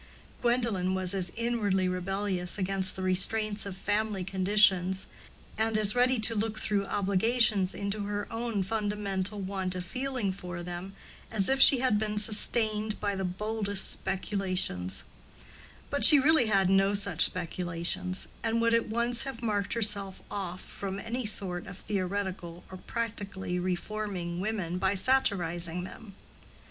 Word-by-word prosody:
Gwendolen 230 -7 0
was 185 0 0
as 185 -3 0
inwardly 215 -5 0
rebellious 185 0 -2
against 190 -1 0
the 190 - -5
restraints 205 +3 +3
of 190 -1 -7
family 205 -1 -1
conditions, 190 -1 +2 0.5
and 220 0 +1
as 210 -1 +3
ready 250 +1 +2
to 225 +1 +3
look 220 0 -2
through 205 -2 -1
obligations 200 0 +1
into 200 +1 -3
her 205 0 -3
own 225 -3 -2
fundamental 205 -1 -3
want 190 -1 -3
of 180 0 -5
feeling 250 -1 -2
for 180 -2 -7
them, 180 +2 -7 0.3
as 205 -4 +1
if 270 0 +2
she 265 -2 +7
had 250 -5 +2
been 210 -1 -2
sustained 215 0 0
by 205 -1 -2
the 190 - -3
boldest 205 +2 +2
speculations; 185 - -2 0.9
but 285 - -1
she 300 - +12
really 285 -3 +4
had 195 -3 +3
no 195 +1 +3
such 195 -5 +3
speculations, 175 +1 -1
and 225 0 0
would 230 0 +2
at 230 -1 +1
once 235 +1 +1
have 265 -3 -5
marked 205 -3 -1
herself 205 -4 +1
off 185 -2 -5
from 195 -1 -6
any 230 +2 -3
sort 185 -4 -2
of 190 -1 -9
theoretical 190 -3 -4
or 185 - -8
practically 200 -6 -4
reforming 180 -1 -4
women 185 -4 -3
by 190 +2 +1
satirizing 180 -7 +1
them. 200 +1 -11
200 Hz, 145 wpm, -29 LUFS, 185-220 Hz, 0.9 s, she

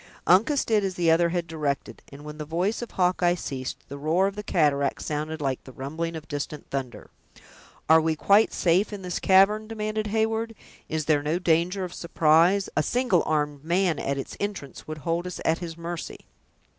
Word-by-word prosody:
Uncas 230 - +4
did 215 -2 +2
as 190 -2 -2
the 170 -2 +3
other 170 +1 +4
had 175 0 -1
directed, 150 -4 -3
and 140 +1 -11
when 150 0 -8
the - - -3
voice 175 +9 -1
of 240 - -5
Hawkeye 180 -1 +2
ceased, 135 -6 -5
the 140 +1 -8
roar 160 +6 +2
of 195 0 -2
the 210 - -4
cataract 150 -8 +1
sounded 155 +1 -3
like 135 -2 -2
the 130 - -11
rumbling 160 +6 -4
of 155 -1 -8
distant 145 +1 -5
thunder. 130 -3 -5 0.8
"Are 160 0 +7
we 160 0 0
quite 200 +7 +4
safe 180 +5 +2
in 200 -2 -7
this 180 -1 -3
cavern?" 195 +3 +4
demanded 215 -1 -3
Heyward. 225 +1 -1 0.3
"Is 155 -1 -2
there 150 -2 +3
no 150 +4 0
danger 180 +2 +1
of 180 -1 -5
surprise? 170 +4 +3
A 155 - +3
single 240 -1 +2
armed 150 -2 -1
man, 175 0 +1
at 140 0 -2
its 135 - -6
entrance, 200 -10 -5
would 155 0 -5
hold 165 +4 -2
us 180 - -6
at 160 +1 +2
his 170 -2 -7
mercy." 170 -1 -6
170 Hz, 195 wpm, -26 LUFS, 150-195 Hz, 0.8 s, Are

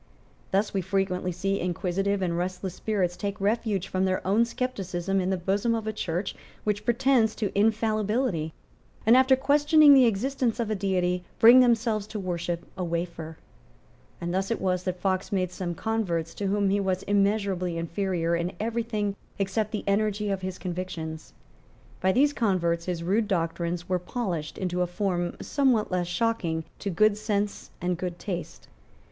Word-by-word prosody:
Thus 200 +2 +1
we 195 - +1
frequently 185 -1 -1
see 195 +3 -1
inquisitive 190 +2 -1
and 170 -2 0
restless 180 +1 -3
spirits 185 -3 -1
take 200 0 -4
refuge 205 -2 0
from 185 0 0
their 185 0 -1
own 210 +5 +3
scepticism 195 -6 -2
in 185 - -1
the 190 - +1
bosom 200 +6 0
of 225 -1 -3
a 220 - -2
church 180 -1 -2 0.3
which 210 0 -1
pretends 240 -2 +3
to 205 -3 -3
infallibility, 215 -4 +1 0.5
and, 225 +3 +7
after 260 +1 +6
questioning 295 +2 +6
the 260 -3 +7
existence 240 +3 0
of 225 -2 -1
a - - +1
Deity, 180 -2 0
bring 235 +3 +9
themselves 230 -4 +2
to 215 0 -5
worship 175 -2 -3
a 185 - -3
wafer. 170 -2 -4 0.8
And 175 0 -3
thus 190 +1 0
it 230 - -1
was 185 -1 0
that 185 -1 -2
Fox 190 0 -1
made 185 -3 0
some 175 -2 -4
converts 180 -7 -1
to 200 - -3
whom 200 0 +1
he 200 - +2
was 190 -1 -1
immeasurably 200 -3 +1
inferior 170 0 -1
in 170 +2 -2
every 230 +2 -1
thing 210 -3 -2 0.2
except 200 +2 0
the 215 - -3
energy 210 0 +1
of 195 -1 -2
his 185 -1 -4
convictions. 170 -3 -5 0.7
By 190 - +3
these 285 +7 +3
converts 170 -7 0
his 175 -2 -3
rude 205 +5 +1
doctrines 170 -1 -1
were 185 -1 +1
polished 180 -5 -4
into 180 -1 -1
a 180 - +1
form 175 -1 -2
somewhat 255 -8 +2
less 180 -1 0
shocking 175 -4 0 0.2
to 200 - -3
good 205 +3 +3
sense 210 -1 -2
and 180 -1 -1
good 180 -1 -3
taste. 65 - -6
195 Hz, 170 wpm, -27 LUFS, 180-215 Hz, 0.8 s, bring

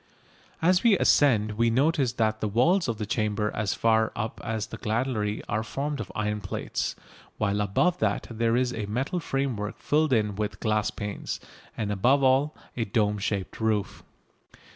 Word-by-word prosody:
As 180 +2 +4
we 225 -5 +5
ascend 110 -11 +4
we 115 0 +4
notice 135 0 +2
that 110 -2 0
the 110 - 0
walls 150 - +3
of 115 -3 -2
the 105 - -3
chamber 105 0 0
as 105 -2 -1
far 110 -1 +2
up 110 -1 -4
as 110 -1 -2
the - - -8
gallery 110 -2 -1
are 105 +1 0
formed 140 +6 -3
of - - -5
iron 105 0 -1
plates, 95 - -3 0.4
while 105 -1 0
above 175 - +1
that - - 0
there 115 0 +1
is 125 -1 +1
a 105 -2 -4
metal 135 - -1
framework 135 -9 -2
filled 155 0 +1
in 105 -4 +2
with 105 -2 -3
glass 110 -1 +1
panes, 105 -1 -5 0.4
and 105 -2 -2
above 125 +8 +3
all 135 +3 +3 0.2
a 115 - 0
dome 105 0 0
shaped 100 -1 -3
roof. 110 -3 -1
110 Hz, 170 wpm, -27 LUFS, 105-130 Hz, 0.4 s, we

